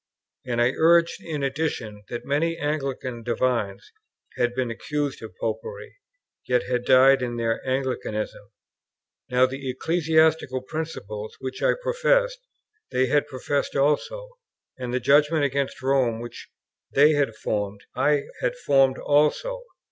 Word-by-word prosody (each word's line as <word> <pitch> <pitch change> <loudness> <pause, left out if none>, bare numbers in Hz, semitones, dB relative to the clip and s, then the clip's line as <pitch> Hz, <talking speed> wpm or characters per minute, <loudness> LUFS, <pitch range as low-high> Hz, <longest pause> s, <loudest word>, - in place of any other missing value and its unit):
And 120 -1 -1
I 120 +1 +4
urged 170 +1 +4
in 150 -4 -4
addition, 135 -7 -2
that 120 - -5
many 165 +4 0
Anglican 135 -5 -3
divines 115 - -1 0.4
had 120 0 0
been 130 -2 -1
accused 145 +4 -3
of 110 -5 -9
Popery, 110 - -5 0.5
yet 125 -1 +2
had 125 -1 -2
died 135 +1 +6
in 120 -1 -3
their 115 -1 -1
Anglicanism; 130 -5 -3 0.8
now, 125 0 +4
the 135 +1 -5
ecclesiastical 160 -2 +2
principles 110 -9 -6
which 130 0 -6
I - - +3
professed, - - +2 0.5
they 130 +1 +2
had 145 +1 +2
professed 140 +1 -2
also; 315 - 0 0.5
and 125 -2 -5
the 125 - 0
judgment 145 +4 +4
against 140 -1 -1
Rome 130 -4 +2
which 120 0 -9 0.4
they 145 +3 +6
had 145 -7 +1
formed, 105 -1 -3
I 145 +2 +2 0.2
had - - 0
formed 135 - +3
also. 150 - +1
135 Hz, 135 wpm, -25 LUFS, 120-150 Hz, 0.8 s, died